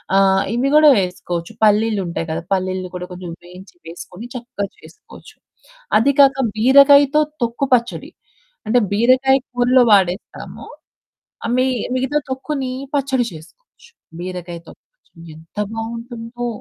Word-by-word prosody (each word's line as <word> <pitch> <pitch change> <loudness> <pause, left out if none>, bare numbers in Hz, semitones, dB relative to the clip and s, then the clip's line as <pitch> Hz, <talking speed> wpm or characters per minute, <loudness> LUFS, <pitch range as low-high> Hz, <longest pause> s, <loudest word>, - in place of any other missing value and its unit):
ఆహ్, 195 0 +3
ఇవి 260 +3 0
గూడా 305 0 +7
వేసుకోవచ్చు 180 0 -4
పల్లీలుంటాయి 205 -6 +1
కదా! 160 +1 -3
పల్లీలు 185 -1 -2
కూడా 180 0 -6
కొంచెం 180 -1 -8
వేయించి, 180 +2 -14
వేసుకొని 180 +6 -10
చక్కగా 235 -4 -5
చేసుకోవచ్చు. 425 - -16 0.6
అది 245 +6 +3
కాక, 275 -1 +6 0.2
బీరకాయతో 280 +5 +6 0.2
తొక్కు 235 +3 -1
పచ్చడి. 235 -1 0 0.6
అంటే 245 +3 +3
బీరకాయ 255 +5 +3 0.2
కూరలో 245 +1 +4
వాడేస్తాము. 190 -2 0 0.8
ఆహ్, 235 - -1
మి 255 +1 +2 0.3
మిగతా 265 +3 0
తొక్కుని, 265 0 -3 0.2
పచ్చడి 265 -3 0
చేసుకోవచ్చు. 470 - -17 0.3
బీరకాయ 180 -1 -6
తొక్కు - - -17
పచ్చడి, 165 - -19
ఎంత 160 +5 -20 0.2
బాగుంటుందో 230 +1 -6
230 Hz, 120 wpm, -19 LUFS, 185-260 Hz, 0.8 s, గూడా